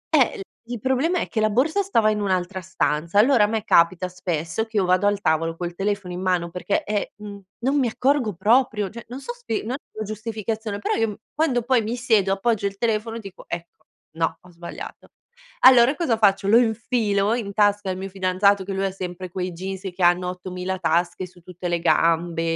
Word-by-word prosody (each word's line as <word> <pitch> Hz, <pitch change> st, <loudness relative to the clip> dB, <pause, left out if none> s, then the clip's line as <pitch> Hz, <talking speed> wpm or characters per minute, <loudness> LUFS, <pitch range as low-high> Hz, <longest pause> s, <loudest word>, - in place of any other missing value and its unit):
Eh -, -, +4 dB
il -, -, -7 dB, 0.3 s
il 240 Hz, -1 st, -5 dB
problema 265 Hz, -, +1 dB
è -, -, -2 dB
che 220 Hz, -, -2 dB
la 215 Hz, -, +3 dB
borsa 290 Hz, -, +2 dB
stava 230 Hz, -, +2 dB
in 210 Hz, -1 st, 0 dB
un'altra 185 Hz, -1 st, -1 dB
stanza. 170 Hz, -1 st, 0 dB
Allora 235 Hz, -1 st, +5 dB
a -, -, +4 dB
me 220 Hz, 0 st, -2 dB
capita 170 Hz, +2 st, +3 dB
spesso 175 Hz, +1 st, -3 dB
che 220 Hz, -1 st, -5 dB
io 195 Hz, -, +3 dB
vado 185 Hz, +2 st, +3 dB
al 205 Hz, -1 st, +1 dB
tavolo 165 Hz, -2 st, 0 dB
col 175 Hz, 0 st, -5 dB
telefono 195 Hz, -1 st, -2 dB
in 180 Hz, -, -5 dB
mano 180 Hz, -2 st, 0 dB
perché, 180 Hz, +3 st, -2 dB
eh, 210 Hz, -1 st, -2 dB
mhmm, 205 Hz, -1 st, -9 dB, 0.2 s
non 275 Hz, +2 st, +2 dB
mi 260 Hz, -4 st, +2 dB
accorgo 255 Hz, -2 st, +1 dB
proprio. 215 Hz, +1 st, +2 dB
Cioè 235 Hz, +3 st, -10 dB
non 255 Hz, -, -6 dB
so 480 Hz, +12 st, -6 dB
spie 480 Hz, -, -4 dB
non 225 Hz, -, -4 dB
è -, -, -1 dB, 0.2 s
una 215 Hz, 0 st, -5 dB
giustificazione, 215 Hz, 0 st, -4 dB
però -, -, -1 dB
io 225 Hz, -, +1 dB
m 205 Hz, -, -6 dB, 0.2 s
quando 270 Hz, -6 st, +1 dB
poi 245 Hz, 0 st, +3 dB
mi 225 Hz, +3 st, -3 dB
siedo 220 Hz, -6 st, +2 dB
appoggio 200 Hz, +1 st, 0 dB
il 200 Hz, 0 st, -7 dB
telefono 225 Hz, 0 st, -1 dB
dico: 195 Hz, -5 st, -10 dB
"Ecco, 170 Hz, 0 st, -8 dB, 0.2 s
no 165 Hz, +1 st, -1 dB
ho 180 Hz, -, -18 dB
sbagliato". 170 Hz, 0 st, -9 dB, 0.6 s
Allora 255 Hz, +1 st, +7 dB
cosa 280 Hz, -10 st, +1 dB
faccio, 200 Hz, -2 st, +3 dB
lo 220 Hz, +3 st, +6 dB
infilo 220 Hz, -3 st, +1 dB
in 225 Hz, -4 st, -3 dB
tasca 205 Hz, -1 st, +2 dB
al 185 Hz, -, -2 dB
mio 190 Hz, +1 st, -5 dB
fidanzato, 190 Hz, +1 st, +2 dB
che 195 Hz, -, -6 dB
lui 195 Hz, +1 st, -1 dB
ha 195 Hz, -, -1 dB
sempre 185 Hz, -1 st, -6 dB
quei 180 Hz, +1 st, -3 dB
jeans 190 Hz, +2 st, -6 dB
che 185 Hz, -, -9 dB
hanno 175 Hz, +1 st, +3 dB
8.000 180 Hz, 0 st, -5 dB
tasche 175 Hz, +2 st, 0 dB
su 180 Hz, 0 st, -20 dB
tutte 180 Hz, +1 st, -7 dB
le 175 Hz, -1 st, 0 dB
gambe, 165 Hz, +1 st, +2 dB
200 Hz, 215 wpm, -23 LUFS, 180-225 Hz, 0.6 s, Allora